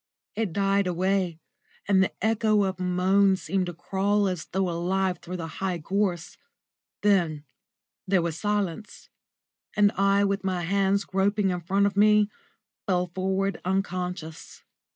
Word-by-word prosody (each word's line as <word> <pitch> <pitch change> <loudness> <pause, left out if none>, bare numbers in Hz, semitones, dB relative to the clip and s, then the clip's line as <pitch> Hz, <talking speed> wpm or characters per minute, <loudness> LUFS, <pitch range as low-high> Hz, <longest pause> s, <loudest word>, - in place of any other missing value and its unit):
It 215 -4 -2
died 195 +1 +1
away, 180 -1 0 0.5
and 195 -1 +4
the 190 - +1
echo 215 -2 +2
of 190 -1 -2
a - - -3
moan 190 +2 +3
seemed 190 0 -2
to 175 - -5
crawl 200 +4 0
as 180 -4 -3
though 190 0 -1
alive 180 +2 -1
through 180 +1 -6
the 165 - -5 0.2
high 185 -2 -1
gorse. 180 0 -2 0.7
Then 175 -8 +2 0.6
there 185 -2 +2
was 165 -2 -2
silence, 205 0 -3 0.7
and 205 -1 +4
I, 200 0 +2
with 200 0 0
my 185 -2 -1
hands 195 +2 +1
groping 195 +1 +1
in 180 -1 -3
front 195 +4 +1
of 200 - 0
me, 210 0 +4 0.6
fell 180 -2 0
forward 190 +1 -1
unconscious. 180 -3 -4
190 Hz, 145 wpm, -26 LUFS, 180-200 Hz, 0.7 s, and